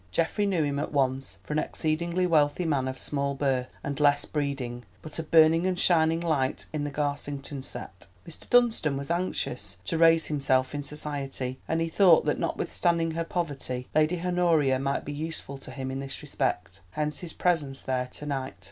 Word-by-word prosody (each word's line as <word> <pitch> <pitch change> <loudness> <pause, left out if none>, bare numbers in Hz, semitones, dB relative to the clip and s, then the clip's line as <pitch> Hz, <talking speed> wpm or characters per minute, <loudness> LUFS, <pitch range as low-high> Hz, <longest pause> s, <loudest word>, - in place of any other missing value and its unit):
Geoffrey 165 - 0
knew 180 -5 +1
him 140 -1 -1
at 150 - -3
once 135 -2 0
for - - -5
an 155 - +2
exceedingly 170 +4 0
wealthy 155 0 +2
man 140 -5 +1
of 130 0 -4
small 140 0 -1
birth, 130 -2 0
and 140 -1 -3
less 145 -1 +4
breeding, 135 -5 -3 0.2
but 155 +1 -6
a - - +1
burning 165 +2 +5
and 185 -1 0
a - - -4
shining 165 -2 +4
light 150 -6 0
in 150 -1 -1
the - - -2
Garsington 145 -1 -3
set. 95 -8 -8 0.2
Mr. 165 - -10
Dunstan 230 - +3
was 140 +3 -4
anxious 125 - -2
to 165 - -1
raise 165 -1 +6
himself 135 -3 +1
in 145 - -2
society, 140 -3 -4
and 165 +1 0
he 165 - +1
thought 170 -1 +5
that 150 - 0
notwithstanding 170 -2 0
her 165 +1 -2
poverty, 140 -7 -3
Lady 155 +3 +2
Honoria 165 -7 +3
might 140 +1 -1
be 145 - -4
useful 150 -2 -5
to 135 - -11
him 130 0 -5
in 135 - -3
this 135 0 -6
respect. - - -2
Hence 150 +6 -2
his 175 -2 -5
presence 150 -7 0
there 130 -1 -1
to 150 - -9
night. 135 -2 -3
145 Hz, 190 wpm, -27 LUFS, 135-165 Hz, 0.2 s, raise